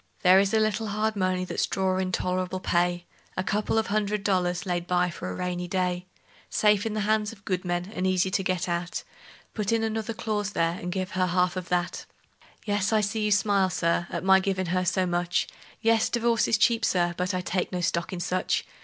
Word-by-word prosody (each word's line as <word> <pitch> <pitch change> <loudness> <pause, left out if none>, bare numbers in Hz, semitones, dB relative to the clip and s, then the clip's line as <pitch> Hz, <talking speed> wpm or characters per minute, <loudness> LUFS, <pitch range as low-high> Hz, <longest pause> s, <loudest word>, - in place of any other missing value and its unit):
There 185 +1 +7
is 195 0 +2
a 220 - +3
little 215 +1 0
hard 215 +1 -1
money 185 -1 0
that's - - -1
drawin' 185 -1 0
tol'rable 185 0 -1
pay: 175 0 +1 0.3
A 185 - 0
couple 210 +3 0
of 220 - +2
hundred 210 -1 -1
dollars 180 -2 0
laid 175 -1 -2
by 180 0 +2
for 90 - -6
a 90 - -4
rainy 180 - -3
day; 180 0 -1 0.4
Safe 210 0 +3
in 215 - -3
the 215 - 0
hands 215 0 +1
of 195 - -16
good 185 -1 -1
men, 175 +2 -2
and 185 +1 -1
easy 185 0 +1
to 195 - +1
get 185 -1 -1
at; 175 0 -2 0.5
Put 210 -1 -1
in 225 -1 +2
another 220 0 -2
clause 210 -2 -2
there, 165 0 +1
and 180 - -4
give 185 0 -3
her 185 0 +1
half 180 0 +1
of 185 -1 -5
that. 175 -1 -1 0.6
Yes, 205 -1 0
I 215 -1 +3
see 215 +2 -1
you 210 - +1
smile, 200 -2 +3
Sir, 175 -1 0
at - - -4
my 190 0 +6
givin' 190 -2 -1
her 185 0 +1
so 185 +1 +1
much; 175 0 0 0.4
Yes, 225 -1 +3
divorce 235 -1 +2
is 220 - +3
cheap, 230 +2 +3
Sir, 175 -4 +2
but 180 +2 -1
I 180 - -1
take 180 0 -2
no 180 -1 -2
stock 170 0 -1
in 185 - -4
such! 185 +1 -1
185 Hz, 215 wpm, -26 LUFS, 180-210 Hz, 0.6 s, There